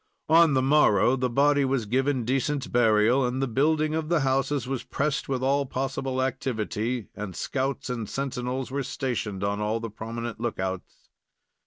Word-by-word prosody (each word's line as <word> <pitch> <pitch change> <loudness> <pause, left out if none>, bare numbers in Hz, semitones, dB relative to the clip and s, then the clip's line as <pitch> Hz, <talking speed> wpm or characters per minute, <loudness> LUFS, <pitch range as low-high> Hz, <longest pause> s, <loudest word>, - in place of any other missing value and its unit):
On 165 -2 +6
the 130 - +2
morrow 130 -5 +4
the 125 -1 -1
body 145 +3 +3
was 135 -4 0
given 130 +2 0
decent 135 +2 -1
burial, 115 +2 +4
and 125 +1 -1
the 135 - 0
building 155 +5 +1
of 160 -1 -2
the 170 -3 +2
houses 135 -1 0
was 135 -2 -3
pressed 135 -2 -2
with 130 -1 -1
all 140 +1 +1
possible 130 0 -2
activity, 120 -3 -2
and 100 -3 -6
scouts 135 0 -2
or 120 -2 -3
sentinels 130 0 -3
were 140 +1 -1
stationed 125 -7 -3
on 100 +1 -1
all 110 +2 0
the 115 -1 -6
prominent 115 +2 -6
lookouts. 95 -6 -5
130 Hz, 165 wpm, -26 LUFS, 115-135 Hz, -, On